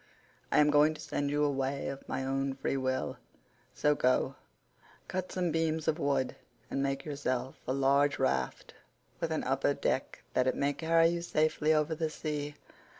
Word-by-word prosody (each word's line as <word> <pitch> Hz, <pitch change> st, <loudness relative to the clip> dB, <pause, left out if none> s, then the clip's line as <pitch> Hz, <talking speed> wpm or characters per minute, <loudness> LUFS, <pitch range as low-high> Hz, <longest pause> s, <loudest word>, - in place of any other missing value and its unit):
I -, -, +3 dB
am 150 Hz, 0 st, +6 dB
going 150 Hz, +1 st, +5 dB
to -, -, -11 dB
send 145 Hz, 0 st, -2 dB
you 145 Hz, +1 st, +1 dB
away 140 Hz, -1 st, 0 dB
of 135 Hz, 0 st, -6 dB
my 130 Hz, 0 st, -2 dB
own 135 Hz, 0 st, -1 dB
free 135 Hz, 0 st, -1 dB
will; 130 Hz, -1 st, -1 dB, 0.6 s
so 150 Hz, -, +3 dB
go, 130 Hz, -1 st, +2 dB, 0.7 s
cut 185 Hz, 0 st, -3 dB
some 180 Hz, -2 st, 0 dB
beams 160 Hz, -1 st, 0 dB
of 160 Hz, +1 st, +1 dB
wood, 140 Hz, -4 st, 0 dB, 0.4 s
and 135 Hz, -, 0 dB
make 135 Hz, 0 st, -1 dB
yourself 130 Hz, -3 st, -2 dB
a 130 Hz, -, +1 dB
large 140 Hz, +1 st, +3 dB
raft 135 Hz, -, -1 dB, 0.5 s
with -, -, -1 dB
an -, -, -1 dB
upper -, -, +1 dB
deck -, -, -2 dB
that 130 Hz, 0 st, +2 dB
it 130 Hz, -, +2 dB
may 140 Hz, 0 st, +1 dB
carry 165 Hz, +2 st, +4 dB
you 170 Hz, 0 st, -2 dB
safely 155 Hz, -2 st, +1 dB
over 155 Hz, 0 st, +2 dB
the 160 Hz, 0 st, -1 dB
sea. 150 Hz, -2 st, -4 dB
145 Hz, 175 wpm, -31 LUFS, 135-155 Hz, 0.7 s, am